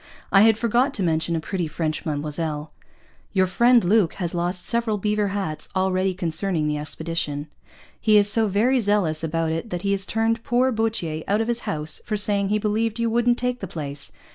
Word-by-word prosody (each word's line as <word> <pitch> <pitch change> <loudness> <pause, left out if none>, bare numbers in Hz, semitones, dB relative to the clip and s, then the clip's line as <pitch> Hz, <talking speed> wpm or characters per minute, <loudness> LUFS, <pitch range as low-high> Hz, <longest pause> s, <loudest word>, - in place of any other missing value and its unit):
(I 195 - +6
had 220 0 +5
forgot 240 +5 +1
to 195 - -1
mention 165 0 0
a - - 0
Pretty 175 +1 -3
French 155 0 -3
Madammoselle.) 150 +1 -3 0.6
Your 190 -2 +3
Friend 235 +5 +4
Luke 190 -1 +3
has 175 -4 -3
lost 175 +1 -2
several 230 -2 0
Beaver 210 +1 0
Hatts 190 -6 -3
already 185 0 +1
concerning 170 -1 0
the 150 0 -1
Expedition. 150 -1 -4 0.5
He 215 -1 +4
is 205 -1 +5
so 220 +1 +4
very 230 +7 +2
zealous 200 -8 +1
about 165 0 -1
it 165 +8 -3
that 180 -1 -4
he 200 - 0
has 195 0 +1
turned 225 +1 0
poor 250 +2 +2
Boutier 215 -9 -2
out 205 +2 +2
of 225 - -1
his 240 0 -2
house 155 0 -3
for 215 - -2
saying 200 -1 +1
he 210 - +2
believed 215 +2 -1
you 230 -1 0
wouldn't 240 +1 +2
take 250 0 -2
the 195 - -5
Place. 145 -4 -6
195 Hz, 195 wpm, -23 LUFS, 165-225 Hz, 0.6 s, I